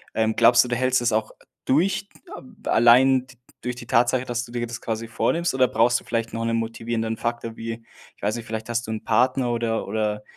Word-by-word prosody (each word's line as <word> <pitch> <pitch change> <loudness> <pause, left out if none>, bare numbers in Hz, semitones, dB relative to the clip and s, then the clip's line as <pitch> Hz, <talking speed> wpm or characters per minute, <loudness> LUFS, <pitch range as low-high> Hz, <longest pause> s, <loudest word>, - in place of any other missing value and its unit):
Ähm, 110 0 +1
glaubst 120 +1 +6
du, 125 - -6
du 120 - 0
hältst 130 0 +2
es 120 -2 +1
auch 110 0 -1 0.3
durch, 195 +8 +1 0.3
ähm, 240 -4 -14
allein 125 +3 +5
t 130 -2 -17 0.2
durch 125 0 -3
die 120 -1 -10
Tatsache, 120 +2 +2
dass 120 -1 -3
du 120 - -14
dir 120 -1 -2
das 120 0 -6
quasi 115 0 -4
vornimmst? 170 +8 0
Oder 130 -1 +4
brauchst 120 +2 +2
du - - -19
vielleicht 115 -1 -2
noch 115 0 -3
'nen 115 - 0
motivierenden 115 0 -2
Faktor 115 -1 -4
wie 115 0 -6 0.3
ich - - -29
weiß 105 +3 -1
nicht, 115 - -7
vielleicht 110 0 -5
hast 120 -1 -2
du - - -4
'nen 110 - -4
Partner 130 -1 +2
oder 115 -1 -1
oder 105 0 -2
120 Hz, 225 wpm, -23 LUFS, 115-125 Hz, 0.3 s, glaubst